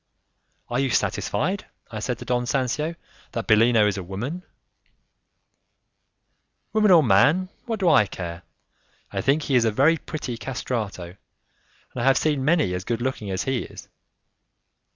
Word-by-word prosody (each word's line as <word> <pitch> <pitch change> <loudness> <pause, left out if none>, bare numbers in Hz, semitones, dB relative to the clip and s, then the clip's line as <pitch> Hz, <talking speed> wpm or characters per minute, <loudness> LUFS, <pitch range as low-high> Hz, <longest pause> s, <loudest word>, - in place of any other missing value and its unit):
"Are 120 - -1
you 135 -1 +1
satisfied," 180 - -1 0.2
I 110 - -5
said 120 +2 -2
to - - -9
Don 125 0 -1
Sancio, 140 +6 -1 0.4
"that 115 - -3
Bellino 115 0 +4
is 100 -1 0
a - - -6
woman?" 115 - -5 2.3
"Woman 215 -1 +3
or 170 -4 +7
man, 145 - +4 0.2
what 225 -3 -2
do 190 - +1
I 135 -11 +5
care! 85 -3 -6 0.7
I - - -2
think 145 +3 +2
he 140 - -2
is 125 -2 +5
a - - +3
very 140 +9 +3
pretty 135 -8 -6
'castrato', 110 -9 -4 0.8
and 125 - -5
I - - -1
have 135 +1 +4
seen 150 -4 0
many 150 - +2
as 90 0 -3
good 115 +2 -2
looking 120 -5 -3
as 95 0 -2
he 130 -2 -1
is." - - -9
125 Hz, 155 wpm, -24 LUFS, 105-150 Hz, 2.3 s, or